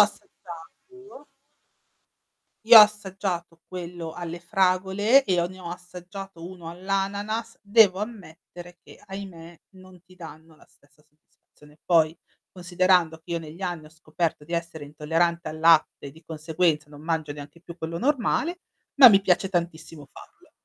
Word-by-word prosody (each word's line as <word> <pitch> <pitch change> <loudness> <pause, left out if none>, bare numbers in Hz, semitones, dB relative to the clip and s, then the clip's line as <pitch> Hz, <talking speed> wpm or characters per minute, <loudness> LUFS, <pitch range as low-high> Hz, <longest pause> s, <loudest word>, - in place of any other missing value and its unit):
assaggiato 210 - -5 1.4
Io 230 0 +10
ho - - +12
assaggiato 190 -5 -3
quello 175 -2 -7
alle 170 0 -7
fragole 190 +6 +2
e 180 -5 +1
ho 170 - 0
ne 185 +1 -12
ho 170 - -8
assaggiato 180 0 -10
uno 175 -2 -10
all'ananas, 200 +5 -3
devo 205 -2 +4
ammettere 175 -5 -10
che, - - -17
ahimè, 175 -4 -10
non 185 -2 -17
ti 185 0 -21
danno 160 -2 -13
la - - -22
stessa 145 +1 -29
soddisfazione. 150 0 -25
Poi 160 -2 +2 0.3
considerando 180 -2 +1
che 165 +2 -9
io 170 - -1
negli 160 +2 -11
anni 175 -4 -4
ho - - -14
scoperto 160 0 -4
di 170 - -11
essere 170 -3 -4
intollerante 165 +4 -1
al 155 - -8
latte 165 -3 +3
e - - -8
di 160 +4 -19
conseguenza 160 -1 -1
non 145 0 -13
mangio 160 -2 -2
neanche 145 +3 -12
più 170 0 -12
quello 165 0 -5
normale, 300 +6 0 0.3
ma 270 -3 +10
mi 195 -3 +5
piace 190 0 +1
tantissimo 165 -4 -5
farlo. - - -17
175 Hz, 150 wpm, -25 LUFS, 160-195 Hz, 1.4 s, ho